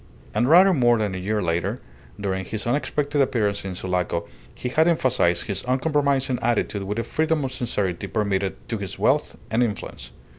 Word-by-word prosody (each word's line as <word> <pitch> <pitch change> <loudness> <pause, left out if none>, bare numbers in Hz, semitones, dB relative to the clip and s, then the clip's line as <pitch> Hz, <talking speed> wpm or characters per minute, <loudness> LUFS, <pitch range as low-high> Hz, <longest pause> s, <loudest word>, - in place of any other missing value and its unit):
And 120 +5 +2
rather 185 +4 +7
more 120 -5 +4
than 105 -3 -1
a 95 - -4
year 105 +2 -1
later, 90 +7 -1 0.4
during 95 -2 -2
his 110 +3 -5
unexpected 145 +3 0
appearance 110 -7 +1
in 95 -1 -5
Sulaco, 90 -2 -2 0.3
he - - -4
had 160 +6 +3
emphasized 125 - +2
his 100 - -3
uncompromising 135 -1 +1
attitude 115 -3 0
with 105 +2 -3
a 115 - 0
freedom 160 0 0
of 130 - -3
sincerity 100 -8 -2
permitted 100 -3 -1
to 115 - -2
his 100 -2 -5
wealth - - +1 0.2
and 115 +2 +2
influence. 100 - -3
110 Hz, 175 wpm, -24 LUFS, 95-135 Hz, 0.4 s, rather